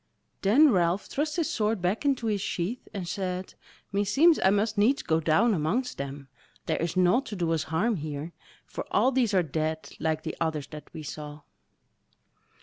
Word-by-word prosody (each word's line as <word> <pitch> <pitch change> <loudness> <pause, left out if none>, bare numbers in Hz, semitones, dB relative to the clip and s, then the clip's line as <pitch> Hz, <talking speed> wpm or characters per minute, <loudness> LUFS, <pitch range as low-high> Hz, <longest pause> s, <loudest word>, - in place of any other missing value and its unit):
Then 265 +9 +6
Ralph 180 -1 +1
thrust 300 +2 -2
his 335 -3 0
sword 215 -1 0
back 185 +9 -1
into 270 -4 +1
his 210 -3 0
sheath 195 +7 -3
and 185 -4 -5
said: 185 0 -3 0.4
"Meseems 210 - +4
I 190 - +6
must 210 +2 +1
needs 225 +7 +3
go 160 -1 +1
down 185 +9 +3
amongst 195 - -1
them; 140 0 -6 0.4
there - - -1
is 170 +2 -2
naught 185 +9 +3
to 210 - -5
do 170 -3 -1
us 160 -2 -1
harm 200 +7 +1
here; 150 +1 -5 0.3
for - - -6
all 260 - +3
these 240 -6 +1
are 185 - +4
dead 160 +1 -3
like 155 -1 -1
the - - -4
others 155 -3 -1
that 150 -1 -10
we 155 - -8
saw." 150 0 -7
185 Hz, 180 wpm, -27 LUFS, 160-225 Hz, 0.4 s, Then